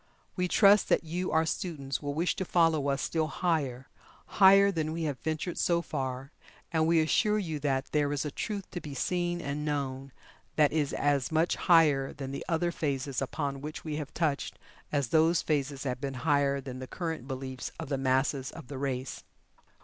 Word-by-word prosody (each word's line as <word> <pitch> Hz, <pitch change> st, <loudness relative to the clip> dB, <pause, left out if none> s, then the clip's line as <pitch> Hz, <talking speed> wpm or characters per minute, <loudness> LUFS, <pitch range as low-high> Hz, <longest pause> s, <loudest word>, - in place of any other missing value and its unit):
We 180 Hz, 0 st, 0 dB
trust 200 Hz, +2 st, +5 dB
that -, -, +3 dB
you 175 Hz, +3 st, -3 dB
our 160 Hz, +1 st, +3 dB
students 150 Hz, -5 st, -3 dB
will 145 Hz, -1 st, -3 dB
wish 170 Hz, +3 st, +1 dB
to -, -, -1 dB
follow 165 Hz, -5 st, +2 dB
us 140 Hz, 0 st, 0 dB
still 160 Hz, -1 st, 0 dB
higher 145 Hz, -7 st, -1 dB, 0.4 s
higher 195 Hz, 0 st, +6 dB
than 160 Hz, -3 st, -2 dB
we 165 Hz, 0 st, -3 dB
have 145 Hz, -4 st, -2 dB
ventured 160 Hz, +3 st, -3 dB
so 170 Hz, -1 st, +2 dB
far, 130 Hz, 0 st, -4 dB, 0.4 s
and 160 Hz, -1 st, +2 dB
we 165 Hz, 0 st, +4 dB
assure 210 Hz, +7 st, +2 dB
you 160 Hz, -7 st, -3 dB
that 135 Hz, -1 st, -1 dB
there 145 Hz, -1 st, +1 dB
is 145 Hz, 0 st, -1 dB
a 150 Hz, -, -3 dB
Truth 200 Hz, +5 st, -4 dB
to 175 Hz, -, -5 dB
be 145 Hz, -2 st, -7 dB
seen 175 Hz, +4 st, -1 dB
and 145 Hz, 0 st, -3 dB
known 135 Hz, -2 st, -3 dB, 0.4 s
that 150 Hz, -2 st, +4 dB
is 150 Hz, -3 st, 0 dB
as 145 Hz, -2 st, +1 dB
much 160 Hz, +2 st, +2 dB
higher 150 Hz, -6 st, +4 dB
than 135 Hz, -2 st, -6 dB
the 140 Hz, -, -5 dB
other 170 Hz, +1 st, +1 dB
phases 140 Hz, -4 st, -2 dB
upon 140 Hz, 0 st, -3 dB
which 150 Hz, +1 st, -6 dB
we 150 Hz, -1 st, -3 dB
have 150 Hz, -3 st, -5 dB
touched, 155 Hz, -4 st, -1 dB, 0.3 s
as 140 Hz, -5 st, 0 dB
those 160 Hz, +4 st, +3 dB
phases 140 Hz, -2 st, -1 dB
have 125 Hz, -2 st, -3 dB
been 135 Hz, -2 st, -3 dB
higher 140 Hz, -1 st, +3 dB
than 130 Hz, -2 st, -7 dB
the 130 Hz, -, -7 dB
current 160 Hz, -6 st, -4 dB
beliefs 130 Hz, -1 st, -5 dB
of 160 Hz, -3 st, -6 dB
the 140 Hz, -, 0 dB
masses 135 Hz, +1 st, +1 dB
of -, -, -11 dB
the 140 Hz, -2 st, -6 dB
race. 130 Hz, -2 st, -3 dB
150 Hz, 195 wpm, -29 LUFS, 135-165 Hz, 0.4 s, higher